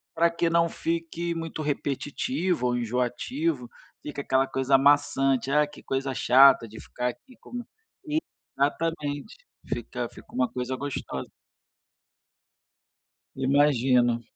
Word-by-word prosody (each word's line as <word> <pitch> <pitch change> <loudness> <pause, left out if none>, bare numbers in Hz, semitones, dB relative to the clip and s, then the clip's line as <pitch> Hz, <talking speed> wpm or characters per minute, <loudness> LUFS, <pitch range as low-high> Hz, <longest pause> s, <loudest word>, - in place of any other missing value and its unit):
para 170 +1 +3
que 170 0 0
não 170 0 +3
fique 170 +1 -3
muito 165 -1 -4
repetitivo 145 - -1
ou 125 - +1
enjoativo, 125 +3 -1 0.3
fica 145 -1 -5
aquela 135 +1 +2
coisa 135 0 +3
maçante: 135 -2 +3
"Ah, 150 0 +4
que 150 - -14
coisa 135 0 -2
chata 130 -1 +6
de 110 +1 -11
ficar 125 0 -3
aqui 255 - -12
como", 245 -1 -7 0.9
exatamente, 145 +2 -1 0.3
fica 120 0 -4
fica - - -16
uma 125 0 +1
coisa 125 +1 -3
gostosa. 140 +2 -5 2.1
Imagino. 130 -3 +3
140 Hz, 115 wpm, -26 LUFS, 125-160 Hz, 2.1 s, chata